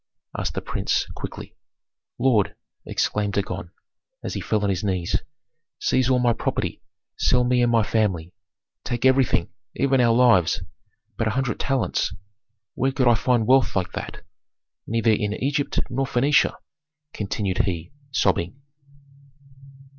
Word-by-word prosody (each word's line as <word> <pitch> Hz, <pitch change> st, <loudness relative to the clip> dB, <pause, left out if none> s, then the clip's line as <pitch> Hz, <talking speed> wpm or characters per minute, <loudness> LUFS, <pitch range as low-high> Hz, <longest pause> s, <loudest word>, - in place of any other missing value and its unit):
asked -, -, -3 dB
the -, -, -3 dB
prince, -, -, 0 dB
quickly. -, -, -8 dB, 0.6 s
"Lord," 115 Hz, -5 st, +2 dB, 0.3 s
exclaimed 105 Hz, -1 st, 0 dB
Dagon, 95 Hz, -2 st, -3 dB, 0.5 s
as -, -, -4 dB
he -, -, -3 dB
fell 105 Hz, -1 st, 0 dB
on 100 Hz, -, +2 dB
his 90 Hz, 0 st, -2 dB
knees, 95 Hz, -4 st, 0 dB, 0.6 s
"seize 130 Hz, -1 st, +1 dB
all 130 Hz, -, +4 dB
my 120 Hz, -1 st, +3 dB
property, -, -, -2 dB, 0.4 s
sell 125 Hz, 0 st, +3 dB
me 125 Hz, 0 st, +2 dB
and 120 Hz, -1 st, +3 dB
my 115 Hz, -2 st, +4 dB
family. 95 Hz, -7 st, 0 dB, 0.5 s
Take 120 Hz, +1 st, -2 dB
everything, 130 Hz, -9 st, +3 dB, 0.3 s
even 135 Hz, -2 st, +2 dB
our 120 Hz, -1 st, +4 dB
lives 115 Hz, -9 st, +4 dB, 0.5 s
but 115 Hz, -, 0 dB
a 110 Hz, +3 st, -1 dB
hundred 135 Hz, -2 st, -1 dB
talents 135 Hz, -2 st, 0 dB, 0.6 s
where 135 Hz, -, 0 dB
could 130 Hz, -1 st, +1 dB
I 120 Hz, -, +7 dB
find 115 Hz, 0 st, +2 dB
wealth 130 Hz, +2 st, +4 dB
like 95 Hz, -2 st, 0 dB
that? -, -, -7 dB, 0.6 s
Neither 115 Hz, 0 st, +2 dB
in 105 Hz, -1 st, 0 dB
Egypt 140 Hz, +5 st, -1 dB
nor 135 Hz, +2 st, -1 dB
Phœnicia," 130 Hz, +1 st, +3 dB, 0.6 s
continued 100 Hz, -2 st, -2 dB
he, 85 Hz, -4 st, -1 dB, 0.2 s
sobbing. 95 Hz, -3 st, 0 dB
115 Hz, 140 wpm, -24 LUFS, 100-130 Hz, 0.6 s, I